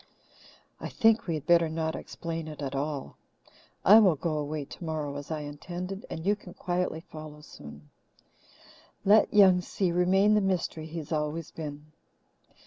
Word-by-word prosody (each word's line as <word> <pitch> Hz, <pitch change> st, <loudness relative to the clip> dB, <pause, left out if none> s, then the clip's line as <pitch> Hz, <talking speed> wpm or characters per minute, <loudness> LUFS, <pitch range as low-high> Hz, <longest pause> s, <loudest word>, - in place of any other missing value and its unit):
"I -, -, -5 dB
think 225 Hz, -1 st, +3 dB
we 165 Hz, -, 0 dB
had 150 Hz, -, -6 dB
better 170 Hz, -1 st, +4 dB
not 160 Hz, 0 st, -2 dB
explain 165 Hz, -1 st, -6 dB
it 150 Hz, -2 st, -8 dB
at 140 Hz, -2 st, -4 dB
all. 140 Hz, 0 st, -4 dB, 0.7 s
I 210 Hz, +4 st, +9 dB
will 190 Hz, -7 st, +5 dB
go 155 Hz, +2 st, -2 dB
away 150 Hz, 0 st, -3 dB
tomorrow, 155 Hz, -2 st, -5 dB
as 145 Hz, 0 st, -7 dB
I 155 Hz, -2 st, -3 dB
intended, 175 Hz, +6 st, -6 dB
and 160 Hz, -, -6 dB
you 205 Hz, +1 st, +3 dB
can 185 Hz, -3 st, -13 dB
quietly 175 Hz, -2 st, -2 dB
follow 155 Hz, -2 st, -10 dB
soon. 75 Hz, -, -13 dB, 1.1 s
Let 210 Hz, +2 st, +5 dB
'Young 190 Hz, -3 st, +6 dB
Si' 180 Hz, 0 st, -1 dB
remain 190 Hz, +4 st, +3 dB
the 210 Hz, -, +4 dB
mystery 180 Hz, -4 st, -1 dB
he 165 Hz, +1 st, -8 dB
has 155 Hz, -1 st, -7 dB
always 155 Hz, +1 st, -2 dB
been." 150 Hz, -1 st, -8 dB
160 Hz, 160 wpm, -28 LUFS, 150-180 Hz, 1.1 s, I